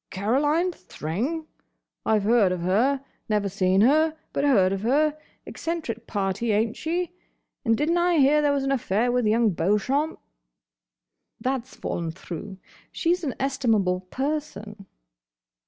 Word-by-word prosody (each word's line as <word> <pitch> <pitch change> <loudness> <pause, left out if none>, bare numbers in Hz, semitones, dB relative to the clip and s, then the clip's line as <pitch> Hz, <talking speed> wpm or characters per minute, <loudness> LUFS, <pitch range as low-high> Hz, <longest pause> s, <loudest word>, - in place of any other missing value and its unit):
"Caroline 290 - +1
Thring? 265 - -4 0.6
I've 215 -2 +3
heard 215 -3 +4
of 180 -1 -2
her. 250 +10 +1 0.2
Never 210 -2 +1
seen 190 0 +2
her: 310 +6 +4 0.2
but - - 0
heard 200 -10 +4
of 195 - -3
her. 295 +7 +2 0.3
Eccentric 310 -9 -4
party, 200 +2 -1
ain't 220 +2 +1
she? 345 +2 -2 0.5
And 225 -3 +2
did 300 +3 +1
n't 345 - +2
I 350 -1 +3
hear 295 +1 +5
there 290 -1 +3
was 280 -1 0
an 270 - 0
affair 240 -2 +1
with 245 -2 +1
Young 225 0 +3
Beauchamp?" 210 - 0 1.2
"That's 260 +1 -3
fallen 170 -1 -3
through. 185 +3 -7 0.3
She's 350 +1 0
an 275 -5 -2
estimable 225 -9 +1
person." 230 -8 -4
240 Hz, 140 wpm, -25 LUFS, 200-295 Hz, 1.2 s, hear